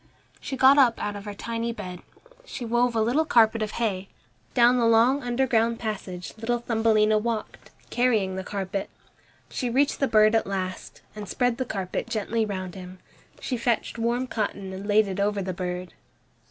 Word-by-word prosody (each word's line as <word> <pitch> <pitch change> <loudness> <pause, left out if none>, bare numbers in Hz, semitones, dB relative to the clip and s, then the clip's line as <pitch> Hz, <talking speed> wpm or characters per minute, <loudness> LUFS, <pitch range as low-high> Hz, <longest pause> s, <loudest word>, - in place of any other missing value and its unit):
She 265 - -5
got 265 +3 +6
up 245 -4 +5
out 205 0 -3
of 200 0 -8
her 205 -1 -6
tiny 230 +2 -3
bed. 185 -6 -7 0.4
She 265 - -7
wove 240 +1 +1
a 225 - +2
little 245 +8 +2
carpet 225 -6 +4
out - - +2
of 210 - -8
hay. 195 -5 -2 0.5
Down 245 0 +5
the 235 -2 +3
long 235 +5 +4
underground 240 -2 +1
passage 195 -5 -5
little 240 +2 0
Thumbelina 220 -2 +2
walked, 225 0 -4 0.2
carrying 220 -7 +1
the 190 - -4
carpet. 195 0 -4 0.6
She 250 - -2
reached 275 +4 +1
the 275 - +2
bird 215 -1 +5
at 225 - +2
last, 185 -2 -5
and 210 -2 -7
spread 245 -2 0
the 260 - -2
carpet 190 -5 -4
gently 220 +1 -1
round 185 -3 -5
him. 185 -1 -10 0.4
She 255 - -3
fetched 235 -1 -1
warm 240 +2 0
cotton 200 -5 -3
and 195 +2 -7
laid 210 0 +4
it 195 0 -4
over 205 0 +1
the 190 -1 -3
bird. 180 0 -5
220 Hz, 180 wpm, -25 LUFS, 200-240 Hz, 0.6 s, got